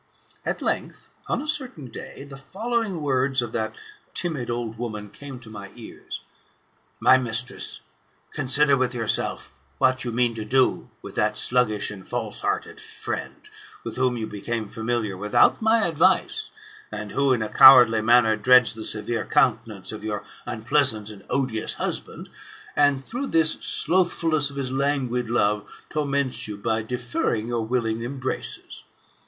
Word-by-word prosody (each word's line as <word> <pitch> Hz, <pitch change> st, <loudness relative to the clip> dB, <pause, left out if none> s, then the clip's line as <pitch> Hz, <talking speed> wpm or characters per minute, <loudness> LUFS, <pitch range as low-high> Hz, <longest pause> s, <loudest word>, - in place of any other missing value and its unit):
At -, -, -3 dB
length, -, -, -3 dB, 0.2 s
on -, -, -1 dB
a -, -, -8 dB
certain 260 Hz, -, -2 dB
day, -, -, -9 dB
the 140 Hz, -1 st, -10 dB
following 205 Hz, -, -3 dB
words 130 Hz, -1 st, +1 dB
of 120 Hz, -2 st, -1 dB
that 110 Hz, -1 st, -2 dB, 0.4 s
timid 155 Hz, -9 st, -1 dB
old 120 Hz, -2 st, -4 dB
woman 105 Hz, -4 st, -5 dB
came 135 Hz, 0 st, -9 dB
to 115 Hz, -, -12 dB
my 100 Hz, -2 st, -8 dB
ears: 115 Hz, -, -9 dB, 0.8 s
"My 130 Hz, -, +6 dB
mistress, 125 Hz, 0 st, -2 dB, 0.5 s
consider 140 Hz, +1 st, +3 dB
with 130 Hz, -1 st, 0 dB
yourself 115 Hz, -3 st, -1 dB, 0.3 s
what 130 Hz, -, +2 dB
you 120 Hz, -, -3 dB
mean 120 Hz, 0 st, +1 dB
to 110 Hz, -1 st, -5 dB
do 130 Hz, +4 st, +1 dB
with -, -, -8 dB
that -, -, +1 dB
sluggish 110 Hz, -5 st, +2 dB
and 100 Hz, -2 st, -9 dB
false -, -, -3 dB
hearted -, -, -2 dB
friend, -, -, -6 dB, 0.4 s
with -, -, -6 dB
whom 130 Hz, -1 st, +1 dB
you 110 Hz, -, -3 dB
became 110 Hz, +2 st, -4 dB
familiar 110 Hz, -2 st, -2 dB
without 105 Hz, -, +3 dB
my 220 Hz, 0 st, +3 dB
advice, 185 Hz, -, +2 dB, 0.4 s
and -, -, -6 dB
who 140 Hz, -1 st, +2 dB
in 120 Hz, -4 st, +2 dB
a 110 Hz, -, -4 dB
cowardly 125 Hz, -4 st, +8 dB
manner 115 Hz, -1 st, +5 dB
dreads 125 Hz, +3 st, +5 dB
the 110 Hz, 0 st, -7 dB
severe 110 Hz, +2 st, -2 dB
countenance -, -, +1 dB
of -, -, -8 dB
your 105 Hz, -2 st, -3 dB, 0.2 s
unpleasant 120 Hz, -2 st, +1 dB
and 100 Hz, -2 st, -12 dB
odious 125 Hz, -4 st, -1 dB
husband, -, -, -5 dB, 0.5 s
and 145 Hz, -2 st, +3 dB
through 250 Hz, -, -4 dB
this 160 Hz, -5 st, +3 dB
slothfulness 165 Hz, -4 st, +1 dB
of 140 Hz, -, -11 dB
his 135 Hz, -2 st, -3 dB
languid 130 Hz, -3 st, -1 dB
love, 105 Hz, -3 st, 0 dB, 0.2 s
torments 140 Hz, -5 st, 0 dB
you 105 Hz, -1 st, -6 dB
by 110 Hz, +2 st, -1 dB
deferring 120 Hz, -, -2 dB
your 120 Hz, -2 st, -1 dB
willing 115 Hz, -1 st, -1 dB
embraces. 130 Hz, +1 st, -5 dB
125 Hz, 150 wpm, -24 LUFS, 110-140 Hz, 0.8 s, cowardly